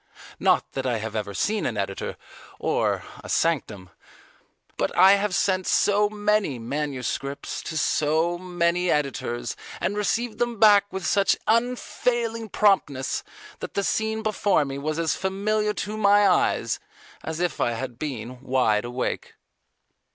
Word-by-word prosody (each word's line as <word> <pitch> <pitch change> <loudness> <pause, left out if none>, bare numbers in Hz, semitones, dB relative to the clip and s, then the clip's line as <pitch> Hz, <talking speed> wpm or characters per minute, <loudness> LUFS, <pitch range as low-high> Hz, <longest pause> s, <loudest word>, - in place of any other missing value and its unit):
Not - - +2
that 135 -1 -3
I 120 -2 +1
have 110 0 -5
ever 100 -2 -3
seen 210 - 0
an 115 - -3
editor 100 -1 -3 0.4
or - - 0 0.2
a - - -9
sanctum. 110 - 0 0.8
But - - -2
I 190 +2 +8
have 200 -1 +2
sent 185 -1 +1
so 205 0 +3
many 210 -8 0
manuscripts 140 +2 -3
to 160 - -5
so 160 +3 +1
many 180 0 0
editors 120 -5 -1 0.2
and 205 - -1
received 215 +2 -1
them 240 -1 0
back 205 -2 +6
with 190 -2 -5
such 195 +4 +3
unfailing 230 -1 0
promptness, 185 -11 +1 0.4
that - - -7
the 200 - +1
scene 220 +2 -1
before 205 -7 +2
me 140 0 -5
was 155 +2 -2
as 165 -2 +1
familiar 210 +3 0
to 210 +2 -4
my 205 -1 +5
eye - - +2 0.6
as 160 0 -4
if 175 -1 -1
I 120 - +1
had 120 0 -5
been 125 -4 -5
wide 125 -5 +1
awake. 125 +1 -3
175 Hz, 145 wpm, -25 LUFS, 130-210 Hz, 0.8 s, I